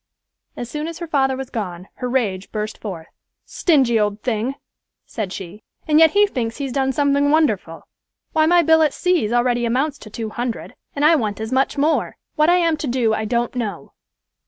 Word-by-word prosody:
As 240 Hz, -, -5 dB
soon 300 Hz, +5 st, -4 dB
as 335 Hz, -1 st, -6 dB
her 345 Hz, -, -5 dB
father 270 Hz, -4 st, +1 dB
was 265 Hz, -1 st, -6 dB
gone, 185 Hz, -5 st, -5 dB
her 250 Hz, -, -3 dB
rage 205 Hz, -7 st, -1 dB
burst 215 Hz, 0 st, -4 dB
forth. 180 Hz, -7 st, -6 dB, 0.4 s
"Stingy 265 Hz, -9 st, +2 dB
old 210 Hz, 0 st, -1 dB
thing," 245 Hz, +2 st, -1 dB, 0.5 s
said 210 Hz, -5 st, -5 dB
she, 195 Hz, +2 st, -8 dB, 0.3 s
"and 305 Hz, 0 st, +4 dB
yet 320 Hz, -1 st, +6 dB
he 415 Hz, 0 st, +5 dB
thinks 240 Hz, -, -3 dB
he's 275 Hz, -3 st, -4 dB
done 265 Hz, 0 st, +1 dB
something 285 Hz, +1 st, +2 dB
wonderful. 220 Hz, -, +1 dB, 0.5 s
Why, 315 Hz, 0 st, +3 dB
my 350 Hz, +1 st, +5 dB
bill 320 Hz, 0 st, +5 dB
at 305 Hz, -3 st, +2 dB
C——'s 360 Hz, -, +1 dB
already 240 Hz, 0 st, +1 dB
amounts 265 Hz, +5 st, 0 dB
to 215 Hz, -, -11 dB
two 220 Hz, 0 st, -5 dB
hundred, 240 Hz, 0 st, -4 dB, 0.2 s
and 290 Hz, +1 st, +1 dB
I 325 Hz, +2 st, +6 dB
want 215 Hz, -8 st, -2 dB
as 220 Hz, +2 st, -5 dB
much 270 Hz, +2 st, +1 dB
more. 305 Hz, +3 st, +1 dB, 0.2 s
What 305 Hz, +1 st, +3 dB
I 350 Hz, -, +5 dB
am 335 Hz, -3 st, +2 dB
to 295 Hz, -, -4 dB
do, 240 Hz, -3 st, +1 dB
I 220 Hz, 0 st, -1 dB
don't 235 Hz, +1 st, -1 dB
know." 210 Hz, -, -5 dB
255 Hz, 200 wpm, -20 LUFS, 220-300 Hz, 0.5 s, yet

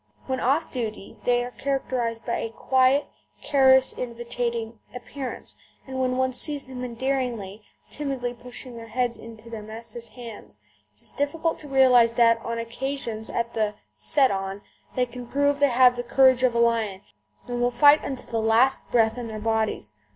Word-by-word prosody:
When 260 Hz, -1 st, -2 dB
"off 285 Hz, +6 st, +1 dB
duty" 220 Hz, -5 st, -5 dB
they 245 Hz, 0 st, +3 dB
are 245 Hz, -, -7 dB
characterised 250 Hz, -4 st, -2 dB
by 235 Hz, -, -1 dB
a 230 Hz, -, -3 dB
quiet, 260 Hz, +4 st, +2 dB, 0.4 s
caress 265 Hz, -2 st, +5 dB
inviting 235 Hz, -1 st, -4 dB, 0.2 s
appearance, 255 Hz, +1 st, -6 dB, 0.3 s
and 260 Hz, -1 st, -5 dB
when 255 Hz, -1 st, 0 dB
one 260 Hz, 0 st, +1 dB
sees 290 Hz, +2 st, +2 dB
them 255 Hz, -1 st, -8 dB
endearingly, 240 Hz, -5 st, -3 dB, 0.3 s
timidly 270 Hz, -4 st, -3 dB
pushing 245 Hz, +1 st, -9 dB
their 230 Hz, 0 st, -9 dB
heads 240 Hz, +1 st, -1 dB
into 225 Hz, 0 st, -12 dB
their 225 Hz, -2 st, -7 dB
masters' 230 Hz, +2 st, -9 dB
hands, 235 Hz, -4 st, -11 dB, 0.4 s
it -, -, -21 dB
is -, -, -3 dB
difficult 320 Hz, +3 st, -1 dB
to 300 Hz, -, -9 dB
realise 255 Hz, -4 st, +5 dB
that 230 Hz, -1 st, +4 dB
on 230 Hz, 0 st, -3 dB
occasions, 230 Hz, -1 st, -4 dB
at 235 Hz, 0 st, -2 dB
the 215 Hz, -2 st, 0 dB, 0.2 s
"set 255 Hz, -, +3 dB
on," 195 Hz, +1 st, -4 dB, 0.3 s
they 250 Hz, -, +2 dB
can 245 Hz, 0 st, -9 dB
prove 285 Hz, +2 st, +1 dB
they 285 Hz, -1 st, +4 dB
have 250 Hz, 0 st, +5 dB
the 245 Hz, -, -2 dB
courage 260 Hz, +1 st, +4 dB
of 255 Hz, -2 st, +2 dB
a -, -, +2 dB
lion, 225 Hz, -5 st, +1 dB, 0.5 s
and 245 Hz, 0 st, -3 dB
will 245 Hz, -, +3 dB
fight 285 Hz, +5 st, +6 dB
unto 265 Hz, -2 st, -5 dB
the 230 Hz, -1 st, -2 dB
last 230 Hz, +4 st, +3 dB
breath 225 Hz, 0 st, +2 dB
in 240 Hz, -, -5 dB
their 220 Hz, -1 st, -6 dB
bodies. 220 Hz, -, -1 dB
245 Hz, 175 wpm, -25 LUFS, 230-260 Hz, 0.5 s, fight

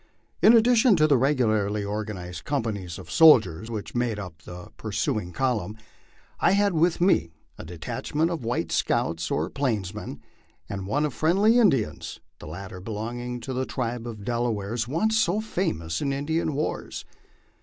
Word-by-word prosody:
In 220 Hz, -, +8 dB
addition 235 Hz, 0 st, +5 dB
to 155 Hz, -3 st, +4 dB
the 150 Hz, -2 st, +4 dB
regularly 110 Hz, -6 st, +1 dB
organ 105 Hz, 0 st, -4 dB
ized 90 Hz, 0 st, -8 dB
companies 105 Hz, -, -3 dB
of -, -, -10 dB
soldiers 110 Hz, -, +5 dB
which 110 Hz, -3 st, -5 dB
made 120 Hz, -3 st, 0 dB
up 90 Hz, -6 st, -8 dB
the 90 Hz, +4 st, -10 dB
pursuing 110 Hz, -, -2 dB
column, 110 Hz, -4 st, -1 dB, 0.6 s
I -, -, +4 dB
had 200 Hz, -1 st, +3 dB
with 165 Hz, +1 st, +2 dB
me 180 Hz, -, +3 dB, 0.3 s
a -, -, -6 dB
detachment 90 Hz, -, -2 dB
of 165 Hz, -7 st, -4 dB
white 115 Hz, -9 st, -2 dB
scouts 80 Hz, +1 st, 0 dB
or -, -, 0 dB
Plainsmen, 105 Hz, -7 st, -3 dB, 0.5 s
and 95 Hz, -1 st, -5 dB
one 145 Hz, +8 st, +1 dB
of 145 Hz, -, -3 dB
friendly 200 Hz, +9 st, +3 dB
Indians, 145 Hz, -, +1 dB, 0.2 s
the -, -, -10 dB
latter 90 Hz, +3 st, -8 dB
belonging 120 Hz, +4 st, -5 dB
to 130 Hz, +3 st, -5 dB
the 130 Hz, +1 st, -2 dB
tribe 120 Hz, -2 st, -3 dB
of 105 Hz, -4 st, -8 dB
Delawares, 115 Hz, -1 st, -1 dB
once 220 Hz, -, +1 dB
so 205 Hz, -1 st, +2 dB
famous 165 Hz, -, -2 dB
in 140 Hz, -, 0 dB
Indian 150 Hz, +2 st, -1 dB
wars. 150 Hz, -, -3 dB
120 Hz, 155 wpm, -25 LUFS, 100-155 Hz, 0.6 s, In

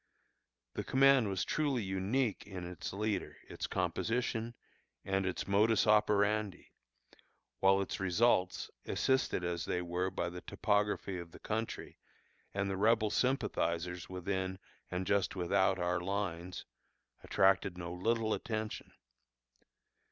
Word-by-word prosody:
The -, -, -3 dB
command 135 Hz, -4 st, +5 dB
was 95 Hz, -2 st, -1 dB
truly 140 Hz, -6 st, 0 dB
unique 100 Hz, +5 st, -1 dB
in 95 Hz, -3 st, -6 dB
its 90 Hz, 0 st, -6 dB
leader, 105 Hz, 0 st, -2 dB
its -, -, -5 dB
composition, 115 Hz, 0 st, -1 dB, 0.5 s
and 95 Hz, -1 st, 0 dB
its 90 Hz, -, -3 dB
modus 105 Hz, +3 st, +4 dB
operandi, 105 Hz, -2 st, +2 dB, 0.9 s
while 95 Hz, 0 st, +5 dB
its 100 Hz, -, -3 dB
results, 95 Hz, 0 st, +2 dB, 0.2 s
assisted 130 Hz, -8 st, +1 dB
as 85 Hz, -1 st, -2 dB
they 90 Hz, -, -1 dB
were 90 Hz, +1 st, -1 dB
by 85 Hz, -, -2 dB
the 90 Hz, 0 st, -7 dB
topography 105 Hz, -3 st, 0 dB
of 85 Hz, -1 st, -8 dB
the -, -, -11 dB
country, 110 Hz, +1 st, -4 dB, 0.5 s
and 100 Hz, 0 st, -1 dB
the 95 Hz, -1 st, -2 dB
Rebel 110 Hz, +1 st, +3 dB
sympathizers 90 Hz, -9 st, 0 dB
within 95 Hz, 0 st, -2 dB, 0.3 s
and 90 Hz, +1 st, -2 dB
just 100 Hz, 0 st, +1 dB
without 95 Hz, +1 st, +2 dB
our 90 Hz, -1 st, 0 dB
lines, 90 Hz, -2 st, -3 dB, 0.6 s
attracted 95 Hz, -1 st, +3 dB
no 85 Hz, -1 st, -5 dB
little 110 Hz, +4 st, +1 dB
attention. 110 Hz, -1 st, -4 dB
95 Hz, 120 wpm, -34 LUFS, 90-110 Hz, 0.9 s, command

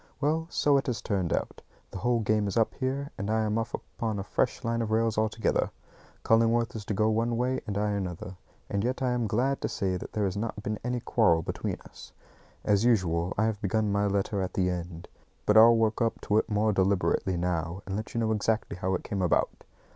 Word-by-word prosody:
Well, 155 Hz, +3 st, 0 dB
so 145 Hz, -4 st, +3 dB
it 135 Hz, -, -1 dB
has 125 Hz, -3 st, -1 dB
turned 95 Hz, -6 st, -1 dB
out! -, -, -2 dB, 0.3 s
The 95 Hz, -, -6 dB
whole 120 Hz, +3 st, +1 dB
game 105 Hz, -1 st, +1 dB
is 100 Hz, -, -2 dB
up 115 Hz, -, +2 dB
here, 140 Hz, +2 st, -3 dB
and 100 Hz, +1 st, -3 dB
I 110 Hz, 0 st, +2 dB
am 110 Hz, +1 st, 0 dB
off 115 Hz, -, -2 dB
upon 110 Hz, -3 st, -4 dB
a 100 Hz, -, -3 dB
fresh 125 Hz, +6 st, -1 dB
line 115 Hz, 0 st, 0 dB
of 115 Hz, -, -2 dB
rails 110 Hz, 0 st, +1 dB
altogether. 110 Hz, +1 st, +1 dB, 0.5 s
Cullingworth 115 Hz, +1 st, +3 dB
is 105 Hz, -2 st, -6 dB
to 105 Hz, -, -2 dB
go 110 Hz, +2 st, +2 dB
one 115 Hz, +2 st, 0 dB
way 125 Hz, +2 st, 0 dB
and 100 Hz, -1 st, -2 dB
I 105 Hz, 0 st, +1 dB
another; 95 Hz, -2 st, -4 dB, 0.3 s
and 100 Hz, 0 st, -1 dB
yet 130 Hz, +2 st, -1 dB
I 125 Hz, -, +2 dB
am 120 Hz, -2 st, 0 dB
glad 125 Hz, +6 st, 0 dB
to -, -, -1 dB
say 95 Hz, -2 st, -1 dB
that -, -, -9 dB
there 105 Hz, -1 st, 0 dB
has 95 Hz, 0 st, -2 dB
not 105 Hz, 0 st, -4 dB
been 105 Hz, 0 st, -3 dB
any 125 Hz, 0 st, -2 dB
quarrel 85 Hz, -10 st, +3 dB
between -, -, -3 dB
us. -, -, -14 dB, 0.5 s
As 100 Hz, 0 st, +3 dB
usual, 90 Hz, -7 st, +2 dB
I 110 Hz, -, +3 dB
have 110 Hz, -2 st, -2 dB
begun 105 Hz, 0 st, 0 dB
my 100 Hz, 0 st, +1 dB
letter 100 Hz, 0 st, 0 dB
at 95 Hz, -, -4 dB
the 90 Hz, -1 st, +2 dB
end, 85 Hz, -1 st, -6 dB, 0.4 s
but 105 Hz, -, +3 dB
I'll 115 Hz, +1 st, +8 dB
work 110 Hz, 0 st, +1 dB
up 115 Hz, -1 st, +1 dB
to 105 Hz, +1 st, +2 dB
it 110 Hz, -, -3 dB
more 105 Hz, 0 st, +2 dB
deliberately 95 Hz, -1 st, +1 dB
now, 85 Hz, +1 st, -2 dB
and 95 Hz, -, -4 dB
let 110 Hz, +3 st, -5 dB
you 115 Hz, -, +1 dB
know 110 Hz, -1 st, +1 dB
exactly 110 Hz, -2 st, 0 dB
how 95 Hz, 0 st, 0 dB
it -, -, -4 dB
came 100 Hz, -2 st, -3 dB
about. 90 Hz, -, +1 dB
110 Hz, 230 wpm, -28 LUFS, 100-115 Hz, 0.5 s, I'll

